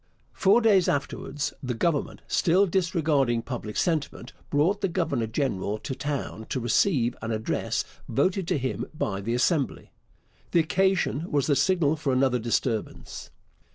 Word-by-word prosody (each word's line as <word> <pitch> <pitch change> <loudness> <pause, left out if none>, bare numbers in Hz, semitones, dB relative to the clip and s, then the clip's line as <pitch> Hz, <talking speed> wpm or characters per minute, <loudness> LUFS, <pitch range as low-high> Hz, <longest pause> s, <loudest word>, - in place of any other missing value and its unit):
Four 205 +4 +4
days 200 -6 +4
afterwards 145 +1 -2
the 125 -2 -3
Government, 150 +4 -1
still 185 +4 +3
disregarding 160 -10 +1
public 115 -5 -5
sentiment, 160 -4 -1 0.2
brought 170 +8 +2
the 195 - +2
governor 120 -9 -1
general 110 -4 -1
to 130 - -5
town 130 - -4
to 130 - -1
receive 120 - +2
an 110 - -4
address 110 -1 -1 0.2
voted 185 - +1
to - - +1
him 130 -1 -3
by 100 -9 -2
the 115 +4 -1
Assembly. 140 +1 0 0.6
The 170 - +5
occasion 180 -1 +1
was 145 -2 +2
the 145 - +2
signal 160 -3 +2
for 150 -3 -1
another 130 -1 +2
disturbance. 115 -1 -3
145 Hz, 145 wpm, -26 LUFS, 120-175 Hz, 0.6 s, The